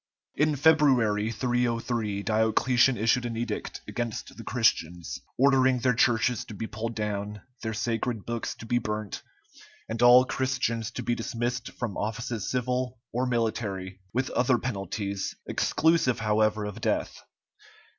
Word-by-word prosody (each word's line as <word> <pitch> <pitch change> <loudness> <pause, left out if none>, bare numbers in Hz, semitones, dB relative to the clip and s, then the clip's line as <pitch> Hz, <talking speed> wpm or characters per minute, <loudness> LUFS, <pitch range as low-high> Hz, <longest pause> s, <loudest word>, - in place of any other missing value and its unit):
In 150 0 +2
February, 130 -8 +4
303, 115 -4 -1
Diocletian 115 +4 +3
issued 115 +3 +2
an 115 -2 -3
edict 115 -2 -4
against 120 -2 -4
the - - -9
Christians, 85 +1 0 0.2
ordering 130 -1 +4
their 125 +1 +2
churches 120 0 +2
to 110 - -9
be 110 - -4
pulled 110 +1 -5
down, 105 -1 -3 0.2
their 110 -1 -3
sacred 115 -1 -2
books 115 -1 -3
to - - -10
be 120 +2 +1
burnt, 105 -2 -4 0.7
and 115 +1 -4
all 125 +1 +8
Christians 125 -4 -1
to - - -6
be 120 - 0
dismissed 120 +1 -3
from 120 -6 -4
offices 115 +1 -3
civil 125 0 -1 0.2
or 125 +2 0
military, 105 -6 -2
with 130 +4 -1
other 125 0 +3
penalties, 100 -4 -3
exclusive 160 -6 +2
however 110 0 +2
of 105 +2 -6
death. - - -1
115 Hz, 135 wpm, -27 LUFS, 110-125 Hz, 0.7 s, all